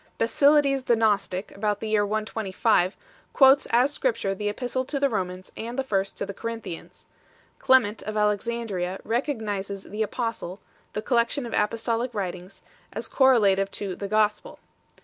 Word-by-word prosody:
Basilides 275 +2 +3
the 235 - +4
Gnostic, 205 -3 0
about 205 0 -1
the 220 - -4
year 215 -1 +3
125, 215 -2 0 0.4
quotes 270 0 +6
as 250 +5 +3
Scrip 260 -5 0
ture 195 - -2
the 205 +2 -2
Epistle 250 +4 -2
to 280 +2 -3
the 280 -1 +2
Romans 185 -2 -4
and 235 +3 -6
the 270 - +1
First 195 -6 -1
to - - -2
the 200 - -6
Corin 230 +2 -5
thians 170 -6 -9 0.6
2. - - -22
Clement 230 -5 +4
of 215 0 -5
Alexandria 210 -3 -1
recognizes 210 -6 -2
"the 210 +2 -6
Apostle 220 -4 -3 0.2
" - - -36
the 210 - -3
collection 240 +2 +1
of 235 - -7
apostolic 230 +2 -1
writings 185 -1 -5 0.3
as - - -5
correlative 205 -8 +4
to 195 -2 -4
"the 200 - -5
Gospel 210 0 0
8 - - -37
215 Hz, 170 wpm, -25 LUFS, 200-240 Hz, 0.6 s, quotes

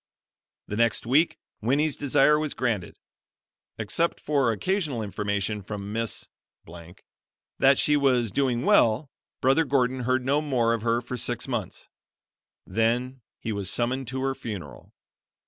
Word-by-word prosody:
The 105 - -4
next 115 -1 +2
week 145 +8 +3 0.2
Winnie's 140 +6 +1
desire 145 +2 +3
was 155 -2 -3
granted. 110 -9 -2 0.8
Except 115 +11 -1
for 140 -5 +1
occasional 145 - -1
information 100 +1 -2
from 100 +1 -6
Miss 115 0 -2 1.3
that 135 0 +5
she 150 - +3
was 130 -6 +2
doing 125 0 0
well, 115 +5 +3 0.3
Brother 135 +5 +4
Gordon 130 -2 +1
heard 130 +1 0
no 140 +3 +2
more 125 -6 +1
of 115 - -2
her 115 +1 +1
for 125 +1 -6
six - - -2
months. - - -4 0.8
Then 120 +3 0 0.2
he 110 - -4
was 100 -2 -2
summoned 125 +4 0
to 130 +2 -3
her 135 0 0
funeral. 105 -8 -8
125 Hz, 135 wpm, -26 LUFS, 110-135 Hz, 1.3 s, that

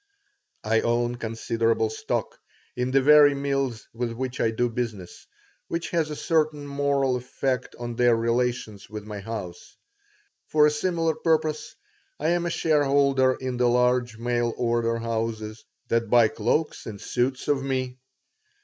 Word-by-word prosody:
I 110 +1 +2
own 120 +1 0
considerable 115 -1 0
stock - - -3 0.4
in 125 +1 -1
the 135 +1 +3
very 145 0 +7
mills 135 -4 -2
with 115 0 -3
which 130 +2 -4
I 115 - +3
do 120 +2 0
business, 115 -6 -5 0.4
which 170 0 -3
has 165 -3 0
a 150 - -4
certain 155 -2 0
moral 140 -2 +1
effect 125 +1 -3
on 120 0 -5
their 120 0 +4
relations 115 -3 -1
with 105 -1 -7
my 105 -1 -6
house. 100 -4 -7 0.7
For 150 -1 +4
a 150 - +4
similar 165 +1 0
purpose 155 -1 -1 0.4
I - - 0
am 175 0 +1
a - - 0
shareholder 140 -5 +2
in 130 -1 -4
the 125 0 +3
large 125 -1 +2
mail 120 0 -1
order 115 -1 0
houses 110 -1 -3 0.3
that 115 -1 +1
buy 120 -2 +5
cloaks 120 +10 -1
and 105 -2 -7
suits 125 +4 -2
of 140 -2 +2
me. 130 -1 -3
125 Hz, 150 wpm, -25 LUFS, 115-140 Hz, 0.7 s, very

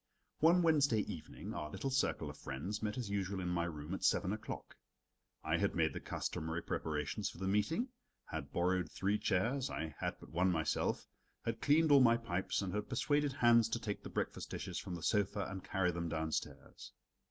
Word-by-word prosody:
One 170 +3 +6
Wednesday 145 -9 +4
evening 80 -6 -6
our 75 - -4
little 135 - -3
circle 135 - +1
of - - -13
friends 90 +11 -4
met 105 +1 -2
as 115 -6 -3
usual 100 -1 -1
in 90 -1 -2
my 85 -1 +1
room 75 0 -5
at 95 - -4
seven 95 +1 +3
o'clock. 110 - -6 0.7
I - - +1
had - - +1
made - - +2
the - - -4
customary 80 +1 -3
preparations 75 +6 -2
for - - -11
the 95 +2 -2
meeting, 105 - +1 0.4
had 70 +1 -5
borrowed 90 -1 +1
three 100 +2 0
chairs 115 +7 +1
I 80 -2 -4
had - - -1
but - - -13
one 90 +3 +3
myself 80 -2 0 0.4
had 115 0 -2
cleaned 155 +2 +4
all 140 -1 +8
my 115 -2 +6
pipes, 95 -3 -1
and 95 - -3
had 105 0 -2
persuaded 145 +2 +1
Hans 120 -4 +5
to 115 - -1
take 105 -3 -3
the - - -7
breakfast - - -3
dishes - - -4
from 90 - -5
the 85 - -7
sofa 100 -1 +1
and 95 -1 -6
carry 95 -2 +1
them 85 0 -3
downstairs. 80 -1 -4
100 Hz, 195 wpm, -36 LUFS, 85-115 Hz, 0.7 s, all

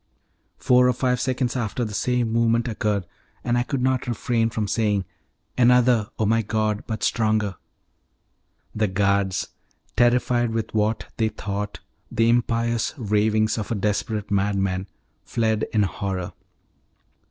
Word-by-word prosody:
Four 125 0 +4
or 125 - +3
five 125 0 0
seconds 130 -1 -1
after 120 0 -2
the 105 - -6
same 120 +1 0
movement 115 +1 +2
occurred, 105 -4 -1 0.4
and 120 -1 0
I 120 - +2
could 125 +1 -2
not 130 -1 +1
refrain 115 0 0
from 110 -2 -2
saying, 105 -3 0 0.5
"Another, 125 -3 +4
O 110 - +1
my 115 +2 +3
God! 110 0 -1
but 110 -2 -4
stronger." 110 -3 +1 1.2
The 110 0 +1
guards, 100 0 0 0.5
terrified 120 0 +2
with 110 -1 -3
what 110 +1 0
they 110 -1 +1
thought 100 0 -5 0.3
the 115 +1 +2
impious 115 0 +1
ravings 110 -1 +1
of 105 - -5
a 115 - -1
desperate 105 +1 -2
madman, 95 -1 0 0.4
fled 110 -2 0
in 105 -2 +3
horror. 95 -2 -3
110 Hz, 135 wpm, -23 LUFS, 105-120 Hz, 1.2 s, Four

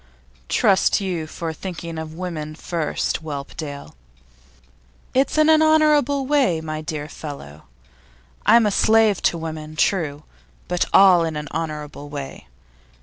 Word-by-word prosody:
'Trust 195 -2 +3
you 180 -5 -3
for 165 0 -5
thinking 170 -2 -6
of 160 0 -7
women 160 -4 -5
first, 165 -1 -2
Whelpdale.' 145 - -7 1.2
'It's 270 +4 +1
in 310 0 +5
an 315 0 +5
honourable 300 -3 +3
way, 260 - +2
my 155 -1 -5
dear 150 -1 -5
fellow. 140 - -9 0.8
I'm 230 -1 +5
a 210 - +2
slave 220 -1 +3
to 170 - +1
women, 155 -1 -6
true, 155 -4 0 0.4
but 180 0 0
all 185 -3 +6
in 160 -1 -3
an 150 0 -5
honourable 150 -2 -5
way. 140 - -8
165 Hz, 130 wpm, -22 LUFS, 155-200 Hz, 1.2 s, all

